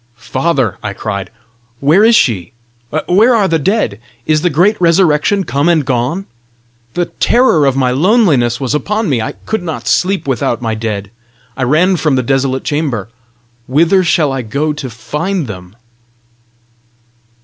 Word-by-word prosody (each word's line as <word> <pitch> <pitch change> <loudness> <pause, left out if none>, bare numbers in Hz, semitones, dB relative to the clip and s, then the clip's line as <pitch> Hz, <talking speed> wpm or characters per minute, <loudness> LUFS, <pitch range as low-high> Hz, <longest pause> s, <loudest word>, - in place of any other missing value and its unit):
"Father," 130 - -1
I 105 -2 -4
cried, 100 -2 -5 0.5
"where 155 +9 +4
is 230 +1 +5
she? 110 - +1 0.5
Where 220 +7 +4
are 205 -4 +2
the 165 -2 +1
dead? 150 - 0 0.3
Is 155 -1 +1
the 175 - +1
great 180 +8 +3
resurrection 170 +2 +3
come 140 +2 0
and 160 -5 +2
gone? 130 +9 -1 0.7
The 175 - +1
terror 230 - +2
of 135 - +1
my 130 -2 +1
loneliness 145 - +2
was 135 0 -2
upon 210 +6 -1
me; 125 -5 0
I 110 - -4
could 220 -2 -2
not 155 -9 -6
sleep 185 +5 +1
without 120 -3 -1
my 115 -2 -2
dead; 105 -3 -4 0.4
I - - -6
ran 165 +9 +2
from 155 -3 +1
the 130 - 0
desolate 135 +1 0
chamber. 140 -9 -2 0.6
Whither 165 +8 +3
shall 155 -4 +2
I 135 - -2
go 140 +7 -2
to 145 -3 -6
find 150 - -3
them?" 90 -3 -9
145 Hz, 155 wpm, -14 LUFS, 120-180 Hz, 0.7 s, is